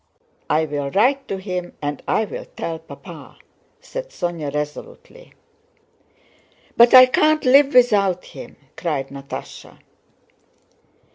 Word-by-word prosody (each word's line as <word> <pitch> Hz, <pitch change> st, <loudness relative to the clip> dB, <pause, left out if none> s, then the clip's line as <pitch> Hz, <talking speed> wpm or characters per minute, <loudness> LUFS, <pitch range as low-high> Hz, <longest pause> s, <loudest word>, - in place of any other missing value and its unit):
I 160 Hz, +1 st, +2 dB
will 145 Hz, -2 st, -4 dB
write 265 Hz, -, +1 dB
to 195 Hz, -, -4 dB
him, 180 Hz, -2 st, -5 dB
and 145 Hz, -1 st, -4 dB
I 220 Hz, -, +1 dB
will -, -, -8 dB
tell 165 Hz, -1 st, -4 dB
Papa!" 160 Hz, -, -13 dB, 0.4 s
said -, -, -7 dB
Sónya 170 Hz, -, -4 dB
resolutely. 475 Hz, -, -8 dB, 1.4 s
"But 235 Hz, +2 st, +6 dB
I 255 Hz, 0 st, +11 dB
can't 305 Hz, +4 st, +1 dB
live 275 Hz, +2 st, +5 dB
without 200 Hz, -7 st, +3 dB
him!" -, -, -12 dB, 0.2 s
cried 145 Hz, -6 st, -3 dB
Natásha. 140 Hz, 0 st, -10 dB
190 Hz, 115 wpm, -20 LUFS, 150-255 Hz, 1.4 s, I